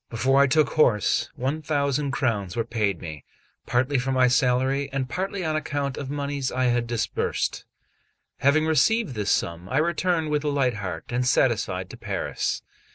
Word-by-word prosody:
Before 135 +4 +3
I 140 - +5
took 150 +1 +3
horse, 120 -10 +2
one 135 +5 -2
thousand 145 -1 0
crowns 115 -8 -1
were 115 - 0
paid 105 -6 -1
me, 80 -5 -8 0.4
partly 130 +3 +1
for 135 +2 -2
my 130 -1 +4
salary, 130 +2 +1
and 135 -1 -2
partly 190 +4 -3
on 155 -1 0
account 145 -3 -2
of 140 -2 -6
monies 140 -2 -2
I 130 - 0
had 120 -1 +1
disbursed. 120 -1 -2 0.7
Having 150 +3 +3
received 160 - +2
this 105 -3 -2
sum, 85 +2 -1
I 130 - 0
returned 170 0 +1
with 150 0 0
a - - -2
light 135 -4 +1
heart 95 -5 -5
and 125 +1 0
satisfied 115 -7 +1
to - - -10
Paris. - - -3
135 Hz, 170 wpm, -25 LUFS, 120-145 Hz, 0.7 s, I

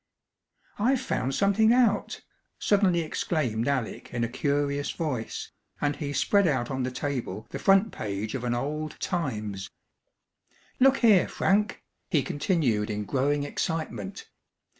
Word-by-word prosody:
"I've 255 +5 +3
found 135 - -1
something 205 +3 +4
out!" 240 -4 +2 0.4
suddenly 195 -4 +3
exclaimed 130 -8 -1
Alec 135 -5 -2
in 120 -1 -1
a - - +1
curious 140 +2 0
voice, 135 -9 -3 0.3
and 145 0 0
he 145 -2 -3
spread 200 +6 +3
out 130 -5 0
on 130 0 -2
the 125 - 0
table 125 -6 -4
the - - -4
front 195 +3 +4
page 105 0 -4
of 130 - -3
an 120 -1 0
old 150 +4 -3
Times. 105 - -3 1.1
"Look 270 +1 +6
here, 205 -5 +6
Frank!" 205 +2 +1 0.3
he 155 -7 +2
continued 140 - 0
in 105 0 -3
growing 145 +4 +1
excitement. 145 - -3
145 Hz, 135 wpm, -27 LUFS, 120-185 Hz, 1.1 s, Look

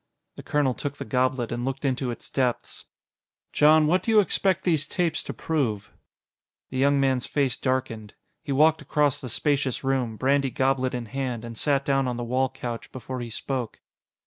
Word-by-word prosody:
The - - -8
colonel 145 -3 +1
took 140 +4 -5
the - - -6
goblet 125 +1 0
and 120 0 -3
looked 135 +2 -3
into 130 -1 0
its 120 - -7
depths. 125 -3 -2 0.7
"Jon, 155 +1 +5
what 175 +4 +3
do 225 - -4
you 220 -1 +6
expect 190 -1 +2
these 155 -5 +1
tapes 170 -2 0
to - - -6
prove?" 120 -11 -2 0.8
The 130 - -3
young 140 +1 +3
man's 130 -2 +1
face 140 -4 +1
darkened. 125 -5 -3 0.3
He 145 - -6
walked 155 +3 +4
across 145 -1 +1
the 125 - -6
spacious 140 +1 0
room, 130 -5 -1
brandy 135 +2 +2
goblet 130 0 0
in 120 -1 -4
hand, 125 -1 -4
and 115 -1 -7
sat 140 +2 +1
down 135 -1 +1
on 125 -1 -2
the 120 - -3
wall 130 +2 +1
couch 120 -3 -6
before 130 0 -6
he 120 -1 -5
spoke. 125 +1 -4
130 Hz, 185 wpm, -25 LUFS, 125-145 Hz, 0.8 s, you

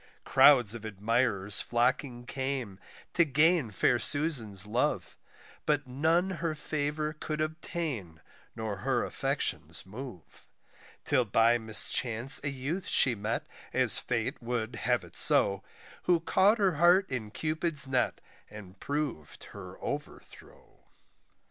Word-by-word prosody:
Crowds 125 -7 +5
of 115 -2 -6
admirers 105 -1 0
flocking 120 +1 -1
came, 130 -7 -4 0.3
to 170 - +4
gain 155 -1 +2
fair 120 +4 +1
Susan's 120 - +1
love; 115 +4 -2 0.5
But 145 -2 +1
none 160 +8 0
her 165 -2 -2
favour 150 0 -3
could 155 0 -5
obtain, 155 - -4 0.4
nor 110 -3 -4
her - - -1
affections - - -2
move, 105 - -11 0.6
Till 125 - +2
by 115 +3 +3
mischance 115 +3 +3
a 145 - -1
youth 145 +7 -4
she 130 - +4
met, 105 +1 -3 0.3
as - - +4
fate 125 +3 -3
would 120 -1 -3
have - - -1
it - - -15
so, 100 -1 +4 0.4
Who 175 -2 +3
caught 190 +6 +3
her 190 -7 +1
heart 175 +4 +4
in 115 -5 -4
Cupid's 155 +2 -2
net 130 -1 -1 0.3
and 100 -3 -12
prov'd 145 - -4
her - - -10
overthrow. - - -9
130 Hz, 125 wpm, -29 LUFS, 110-155 Hz, 0.6 s, Crowds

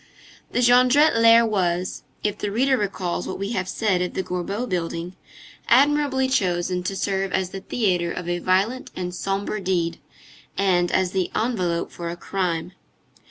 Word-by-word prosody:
The 245 - 0
Jondrette 255 +5 +5
lair 230 0 +6
was, 185 -4 -1 0.2
if 210 -1 -1
the 205 - -2
reader 260 +5 +2
recalls 190 -6 -2
what - - -4
we 200 +2 -3
have 185 -5 -2
said 195 -5 0
of 180 - -3
the 190 - -1
Gorbeau 195 +7 -3
building, 175 -1 -3 0.5
admirably 275 0 +3
chosen 180 -7 0
to 195 - -2
serve 195 0 -1
as 185 -1 0
the 195 - -6
theatre 180 -7 0
of 175 0 -5
a 175 0 -1
violent 195 +9 0
and 180 -1 -4
sombre 195 +3 -2
deed, 175 -3 -1 0.6
and 180 -3 +2
as 185 -1 +1
the 190 -2 -1
envelope 185 -8 -1
for 170 -1 -6
a 170 - -6
crime. 175 -2 -2
190 Hz, 160 wpm, -23 LUFS, 180-230 Hz, 0.6 s, lair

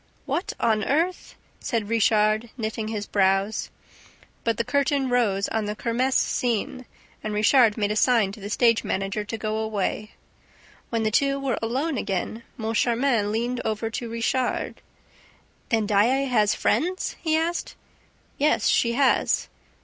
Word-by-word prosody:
"What 300 +7 -2
on 215 -1 +2
earth... 340 +6 -1
?" - - -36
said 225 -4 -2
Richard, 215 0 +2
knitting 220 -1 -3
his 215 -2 -3
brows. 195 +2 +1 0.7
But 230 -2 0
the 235 - +1
curtain 280 +1 +1
rose 205 -6 +2
on 220 -1 -1
the 210 0 -3
kermess 250 +4 0
scene 245 +1 -1 0.4
and 215 -1 -3
Richard 220 +1 +4
made 205 -1 0
a - - -1
sign 225 -3 +3
to 205 - -11
the 200 0 -7
stage 230 +1 +3
manager 195 +2 -2
to 215 +2 -5
go 215 0 -2
away. 215 -1 -2 0.8
When 230 -1 -1
the 215 - +1
two 275 +4 +2
were 270 -4 -1
alone 265 +6 -1
again, 200 +3 -3 0.2
Moncharmin 230 0 +1
leaned 240 +3 -1
over 220 +1 -2
to 235 +1 -4
Richard: 230 +2 -1 0.9
"Then 225 -2 +1
Daae 225 +7 +3
has 215 -5 +2
friends?" 355 - 0
he 315 -1 +1
asked. 335 +2 -2 0.6
"Yes, 300 +2 +2
she 235 -1 +2
has." 265 +2 +2
225 Hz, 150 wpm, -24 LUFS, 215-255 Hz, 0.9 s, Richard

